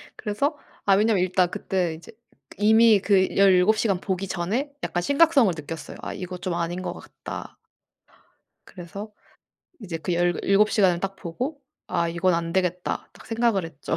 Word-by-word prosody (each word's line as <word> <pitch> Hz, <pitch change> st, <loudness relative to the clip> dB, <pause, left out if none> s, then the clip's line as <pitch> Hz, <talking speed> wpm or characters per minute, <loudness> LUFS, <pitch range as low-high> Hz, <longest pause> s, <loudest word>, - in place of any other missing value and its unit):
그래서 275 Hz, +8 st, -2 dB, 0.3 s
아 195 Hz, -, +5 dB
왜냐하면 210 Hz, -2 st, +3 dB
일단 185 Hz, -1 st, +2 dB
그때 180 Hz, -4 st, -1 dB
이제 160 Hz, 0 st, -12 dB, 0.5 s
이미 220 Hz, +1 st, +5 dB
그 190 Hz, -1 st, +2 dB
17 195 Hz, +2 st, +5 dB
시간 205 Hz, -4 st, +1 dB
보기 190 Hz, +1 st, -3 dB
전에 205 Hz, +12 st, -2 dB
약간 175 Hz, -, -1 dB
심각성을 280 Hz, -, +4 dB
느꼈어요. 155 Hz, +1 st, -8 dB
'아 -, -, -5 dB
이거 180 Hz, 0 st, -6 dB
좀 180 Hz, 0 st, -3 dB
아닌 170 Hz, +1 st, -2 dB
것 -, -, -4 dB
같다.' -, -, -9 dB, 1.1 s
그래서 200 Hz, +4 st, -9 dB, 0.7 s
이제 180 Hz, -7 st, -5 dB
그 175 Hz, +2 st, -2 dB
17 195 Hz, +4 st, +2 dB
시간을 185 Hz, -5 st, +3 dB
딱 195 Hz, +1 st, -3 dB
보고 250 Hz, -, -5 dB, 0.3 s
'아 170 Hz, -, 0 dB
이건 170 Hz, +1 st, +1 dB
안 165 Hz, 0 st, -2 dB
되겠다.' 180 Hz, -1 st, -1 dB
딱 -, -, -16 dB
생각을 225 Hz, -5 st, +1 dB
했죠. 160 Hz, -4 st, -4 dB
190 Hz, 290 characters per minute, -24 LUFS, 175-215 Hz, 1.1 s, 아